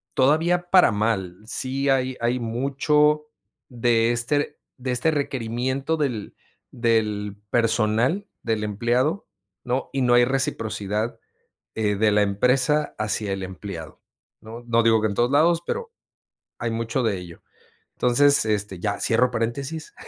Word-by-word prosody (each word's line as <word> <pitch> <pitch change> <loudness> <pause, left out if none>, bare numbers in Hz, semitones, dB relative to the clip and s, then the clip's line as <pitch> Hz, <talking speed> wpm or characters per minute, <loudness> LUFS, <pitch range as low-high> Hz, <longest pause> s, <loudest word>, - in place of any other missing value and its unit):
todavía 165 +6 +2
para 185 -9 +6
mal. 100 -4 -1
Sí 135 +4 -2
hay 130 -1 +1
hay 120 +2 +1
mucho 150 +5 +1 0.4
de 120 -1 +2
este 145 +5 -1 0.2
de 130 0 -3
este 125 +6 +1
requerimiento 135 +1 -2
del, 125 -9 -3 0.4
del 105 -3 0 0.2
personal 115 - +1 0.2
del 110 -2 -1
empleado, 120 - 0 0.4
¿no? 125 +2 -2
Y 135 - -1
no 120 - +3
hay 120 - +6
reciprocidad, 110 -4 -2 0.6
eh, 105 -2 +1
de 110 +1 +3
la 105 - +4
empresa 125 +9 +1
hacia 105 -1 -1
el 95 0 -3
empleado, 95 -3 -8 0.4
¿no? 115 +2 -10
No 115 0 +3
digo 115 -1 +4
que 110 - +1
en 100 - -3
todos 120 +3 +1
lados, 165 +4 +3
pero 465 -1 -4 0.7
hay 115 - -2
mucho 115 +3 -2
de 110 -4 0
ello. 90 -2 -11 0.5
Entonces, 140 +1 +4
este, 105 -4 -2
ya 100 +1 -2
cierro 125 +2 +2
paréntesis. 135 +7 -3
120 Hz, 135 wpm, -23 LUFS, 110-135 Hz, 0.7 s, para